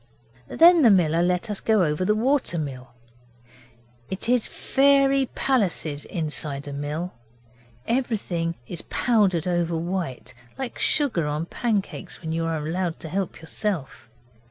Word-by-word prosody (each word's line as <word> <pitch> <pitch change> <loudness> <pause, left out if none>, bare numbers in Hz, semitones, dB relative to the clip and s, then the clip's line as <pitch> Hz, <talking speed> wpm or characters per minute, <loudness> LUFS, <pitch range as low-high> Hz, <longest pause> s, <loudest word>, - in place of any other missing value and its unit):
Then 340 0 +6
the 245 - +7
miller 170 -4 +4
let 180 +4 +1
us 205 - -2
go 220 -3 +2
all - - +4
over 150 +3 -1
the 210 +3 +2
water 250 -5 +1
mill. 130 -5 -5 1.2
It 190 - -4
is 245 -2 +2
fairy 275 -1 +3
palaces 180 - 0
inside 150 -3 -3
a 145 - -5
mill. 150 +5 -4 0.7
Everything 205 -9 -1
is 170 +5 -6
powdered 200 -9 +2
over 175 -2 0
white, 165 -7 -4 0.2
like 265 -2 -5
sugar 240 - +1
on 150 +2 -2
pancakes 200 -3 -3
when 160 -2 -5
you 165 0 -1
are 165 -1 -1
allowed 165 +3 -2
to 160 - -6
help 190 +1 -3
yourself. 160 - -4
175 Hz, 140 wpm, -24 LUFS, 160-225 Hz, 1.2 s, the